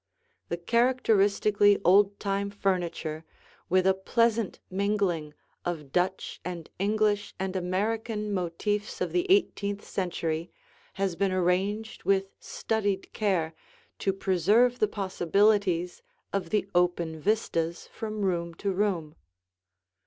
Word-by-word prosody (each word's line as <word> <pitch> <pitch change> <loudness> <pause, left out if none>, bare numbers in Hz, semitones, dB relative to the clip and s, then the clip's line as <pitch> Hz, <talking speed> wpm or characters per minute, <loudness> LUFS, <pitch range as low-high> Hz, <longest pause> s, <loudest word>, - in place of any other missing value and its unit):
The 170 - -1
characteristically 205 -1 +3
old 200 +3 +5
time 200 0 -1
furniture, 175 -5 -2 0.5
with 185 +1 +3
a 190 - +5
pleasant 230 +2 +1
mingling 190 -6 0 0.3
of 155 -6 -4
Dutch 180 +3 -1
and 175 -3 -6
English 205 +1 +1
and 190 0 -2
American 210 +3 -1
motifs 200 +3 -2
of - - -1
the 360 +1 0
eighteenth 205 - +1
century, 170 -3 -2 0.4
has 195 -2 -1
been 195 +1 +1
arranged 190 +4 0
with 195 0 +1
studied 205 -3 -2
care 180 -7 0 0.5
to 195 - +1
preserve 200 +7 +2
the 215 - +3
possibilities 195 -2 +1 0.3
of 190 -4 -1
the 210 0 0
open 175 -2 +1
vistas 170 -4 0
from 215 -2 -4
room 170 -3 -1
to 200 +2 -2
room. 185 -6 -1
195 Hz, 115 wpm, -28 LUFS, 175-210 Hz, 0.5 s, old